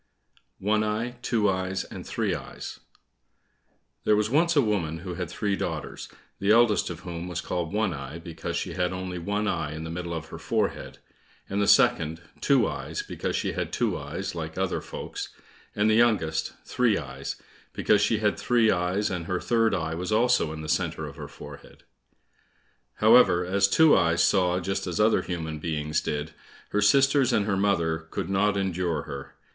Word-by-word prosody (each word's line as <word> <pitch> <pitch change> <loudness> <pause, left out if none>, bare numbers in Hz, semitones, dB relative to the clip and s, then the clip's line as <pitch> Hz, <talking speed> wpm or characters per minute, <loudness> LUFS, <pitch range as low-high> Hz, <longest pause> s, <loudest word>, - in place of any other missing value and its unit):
130 - - -14
One 110 0 +3 0.3
eye, - - -21
Two 115 -4 +1
eyes, 95 0 -1
and - - -9
Three - - -1
eyes - - -7 1.2
There 105 - +4
was 105 +2 0
once 170 +4 +3
a 145 - +6
woman 90 -8 -1
who 90 +2 -6
had 90 -1 -4
three 100 +1 -1
daughters, - - -5 0.3
the 100 - 0
eldest 115 -1 +4
of 85 -2 -7
whom 85 -1 -6
was 90 -1 -3
called 85 -3 -3
One 105 -3 0
eye, 70 +2 -7
because 85 -1 -6
she - - -3
had 90 0 0
only 90 -1 -4
one 105 +4 -1
eye 75 -6 -1
in 80 - -6
the 80 - -5
middle 85 0 -4
of 80 0 -6
her - - -8
forehead, - - -2 0.5
and 100 +1 -1
the 100 - +2
second, 80 +1 +4 0.2
Two 135 -6 +4
eyes, - - -4
because - - -3
she - - -1
had - - -3
two - - 0
eyes - - -5
like 80 -1 -6
other 95 0 -1
folks, - - -6 0.5
and 105 +1 +2
the 110 - +4
youngest, 105 -9 +2
Three 120 -5 +2
eyes, 65 -2 -5 0.4
because 105 -1 +2
she 105 +2 +2
had 105 -1 0
three 115 -3 +3
eyes; 90 +3 0
and 85 -2 -4
her 90 -1 -1
third 115 -3 +2
eye 80 -3 -2
was 90 +5 -4
also 115 -6 +3
in 80 0 -6
the - - -6
centre - - -1
of - - -8
her - - -7
forehead. - - -12 1.1
However, 110 -5 +5
as 100 +2 +3
Two 160 +9 +6
eyes 85 0 +3
saw 90 -1 +3
just 95 +1 -3
as 90 - -3
other 110 +1 +4
human 80 -3 -4
beings 75 -1 -1
did, 75 +1 -3 0.4
her 105 - 0
sisters 135 +4 +4
and 105 - +2
her 100 -2 0
mother 85 -5 0
could 90 - -4
not 100 +1 +2
endure 90 -4 -1
her. 70 -2 -8
95 Hz, 185 wpm, -26 LUFS, 85-105 Hz, 1.2 s, a